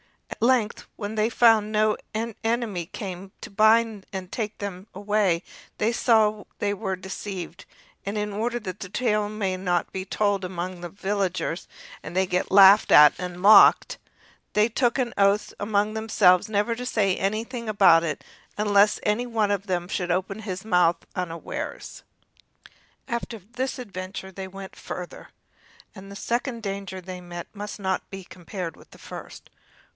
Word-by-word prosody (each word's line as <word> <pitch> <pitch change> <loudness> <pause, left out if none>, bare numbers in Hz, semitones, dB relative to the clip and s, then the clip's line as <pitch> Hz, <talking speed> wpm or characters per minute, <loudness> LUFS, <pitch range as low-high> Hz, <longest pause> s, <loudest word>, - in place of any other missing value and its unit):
At - - -8
length, 245 -5 +1
when 205 0 -5
they 215 +1 +1
found 225 -3 +4
no 215 0 +2 0.2
enemy 225 -4 -2
came 190 -1 -7
to - - -9
bind 220 0 +3
and 190 -2 -6
take 215 -2 -4
them 195 -1 -6
away, 200 -3 +1 0.3
they 220 +2 +1
saw 220 -3 +2
they 205 0 0
were 195 -2 -3
deceived, 190 -2 -7 0.4
and 200 +2 -4
in 210 0 -2
order 235 +4 -1
that 185 -2 -6
the 185 - -7
tale 210 -1 0
might 200 -3 -2
not 180 -2 -1
be 190 - -4
told 200 0 0
of 180 - -3
them - - -10
among 180 0 -4
the 175 - -6
villagers, 190 -3 -2 0.3
and 165 +3 -9
they 190 0 +3
get 180 -1 -1
laughed 195 +1 +7
at 150 0 +9
and 180 -1 -5
mocked, 200 +2 +6 0.5
they 210 +1 +4
took 240 +2 +1
an 245 -2 -1
oath 200 +1 +2
among 205 0 0
themselves 215 -4 +3
never 210 +2 +1
to 250 +2 -6
say 200 -6 +1
anything 225 +4 -3
about 190 -6 +6
it 155 -4 -3 0.3
unless 205 0 +3
any 225 +4 0
one 220 -3 0
of 200 0 -2
them 175 -2 -1
should 180 -1 -3
open 190 +3 -1
his 195 -2 -6
mouth 180 -5 +2
unawares. 170 -3 -5 1.1
After 235 -2 -4
this 240 +7 -5
adventure 190 -4 -7
they 190 0 -7
went 195 0 -10
farther, 180 -1 -8 0.6
but 195 -1 -11
the 200 - -9
second 235 +2 -2
danger 195 -2 -5
they 185 0 -8
met 175 -1 -7
with - - -38
must 205 +1 -6
not 190 -1 -2
be 195 -1 -8
compared 180 -1 -7
with - - -18
the - - -16
first. - - -10
200 Hz, 165 wpm, -25 LUFS, 185-215 Hz, 1.1 s, at